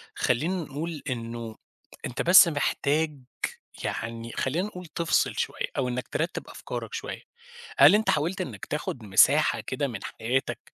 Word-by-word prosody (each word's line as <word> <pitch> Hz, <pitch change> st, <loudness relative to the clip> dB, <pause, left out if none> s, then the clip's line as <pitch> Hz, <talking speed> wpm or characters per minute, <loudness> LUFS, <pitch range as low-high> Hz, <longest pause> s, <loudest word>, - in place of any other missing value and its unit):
خلّينا 150 Hz, +10 st, +1 dB
نقول 155 Hz, +2 st, -5 dB
إنه 115 Hz, -2 st, -5 dB, 0.5 s
أنت 125 Hz, -, -3 dB
بس 180 Hz, +1 st, +8 dB
محتاج 150 Hz, 0 st, 0 dB, 0.6 s
يعني 115 Hz, 0 st, -4 dB
خلّينا 165 Hz, +9 st, 0 dB
نقول 180 Hz, -4 st, -9 dB
تفصل 165 Hz, +1 st, +1 dB
شوية، -, -, -2 dB
أو 130 Hz, -2 st, +1 dB
إنَّك 125 Hz, 0 st, -3 dB
ترتّب 165 Hz, +3 st, -3 dB
أفكارك -, -, -6 dB
شوية. 455 Hz, +1 st, -5 dB, 0.6 s
هل -, -, +8 dB
أنت 220 Hz, -, +1 dB
حاولت 170 Hz, +6 st, +1 dB
إنَّك 120 Hz, -, -6 dB
تأخد 145 Hz, -5 st, -4 dB
مساحة 95 Hz, -2 st, +4 dB
كده -, -, -2 dB
من -, -, -6 dB
حياتك 125 Hz, +4 st, -2 dB
145 Hz, 140 wpm, -27 LUFS, 120-170 Hz, 0.6 s, بس